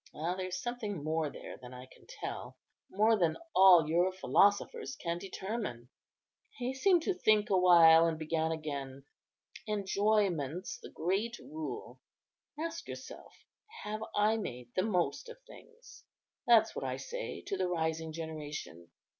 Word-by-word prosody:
Ah! 165 +4 -2
there's 185 0 -4
something 215 - -4
more 155 0 0
there - - -9
than 125 0 -11
I 125 0 -9
can - - -20
tell; - - -7 0.3
more 215 +3 +3
than 165 -3 +2 0.2
all 180 -5 +8
your 175 +4 +2
philosophers 205 - +2
can 170 0 -3
determine." 190 - -5 0.7
He 250 +1 -2
seemed 345 +5 +3
to 390 - +1
think 215 - +2
awhile, 170 -3 +7
and 165 -1 -1
began 160 +1 -1
again: 140 -4 -5 0.6
"Enjoyment's 195 -5 0
the - - -10
great 200 +8 -1
rule; 315 +2 -7 0.6
ask 335 +1 -4
yourself, - - -9 0.5
'Have 215 +1 -4
I 215 +2 +3
made 125 - -6
the 185 - +2
most 190 - -1
of 475 - -10
things?' 475 0 -16 0.4
that's 225 -2 +5
what - - -4
I - - -2
say - - -6
to 400 0 -3
the 185 - 0
rising 160 -2 -2
generation. 155 - -7
185 Hz, 140 wpm, -32 LUFS, 160-220 Hz, 0.7 s, all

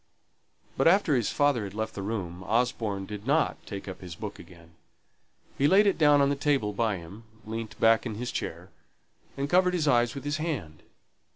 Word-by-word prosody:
But - - +3
after 175 -4 +4
his 120 -4 +1
father 145 -6 +2
had 100 0 -7
left 110 0 -3
the 100 - -5
room 95 -4 -4
Osborne 110 -4 0
did 105 +3 -8
not 150 +3 +1
take 100 -1 -7
up 95 - -7
his 90 -2 -8
book - - -7
again. 85 -2 -15 0.9
He 140 - +4
laid 195 +5 +5
it 200 -4 +2
down 145 -2 +5
on 140 - +3
the 140 - +1
table 135 -7 0
by 110 -2 0
him, 90 +6 -11 0.2
leant 110 0 -6
back 115 +2 +4
in 110 - -5
his 125 +3 -4
chair, - - -5 0.7
and 140 +1 -1
covered 180 +3 +3
his 155 -4 0
eyes 120 -2 +3
with 140 - -6
his 145 +1 -2
hand. 140 - -4
115 Hz, 195 wpm, -28 LUFS, 100-145 Hz, 0.9 s, laid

